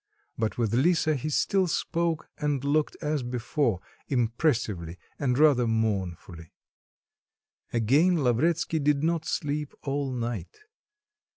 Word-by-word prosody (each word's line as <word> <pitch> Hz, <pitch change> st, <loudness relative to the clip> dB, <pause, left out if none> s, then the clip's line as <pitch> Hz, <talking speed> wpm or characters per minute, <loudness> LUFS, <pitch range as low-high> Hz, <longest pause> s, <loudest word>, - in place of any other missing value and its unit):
But 110 Hz, -1 st, -2 dB
with 115 Hz, -3 st, 0 dB
Lisa 155 Hz, +4 st, +3 dB
he 150 Hz, +2 st, -3 dB
still 190 Hz, +5 st, +2 dB
spoke 165 Hz, 0 st, -1 dB
and 145 Hz, -3 st, -1 dB
looked 145 Hz, +2 st, +1 dB
as 150 Hz, -1 st, 0 dB
before, 120 Hz, -, -1 dB, 0.3 s
impressively 115 Hz, -, 0 dB, 0.2 s
and 125 Hz, -3 st, +1 dB
rather 140 Hz, -5 st, +5 dB
mournfully. 95 Hz, -7 st, -2 dB, 1.2 s
Again 145 Hz, +9 st, +3 dB
Lavretsky 160 Hz, +6 st, +1 dB
did 145 Hz, 0 st, +1 dB
not 165 Hz, -1 st, 0 dB
sleep 150 Hz, 0 st, -2 dB
all 140 Hz, -1 st, -2 dB
night. 115 Hz, -7 st, -4 dB
140 Hz, 110 wpm, -27 LUFS, 115-155 Hz, 1.2 s, rather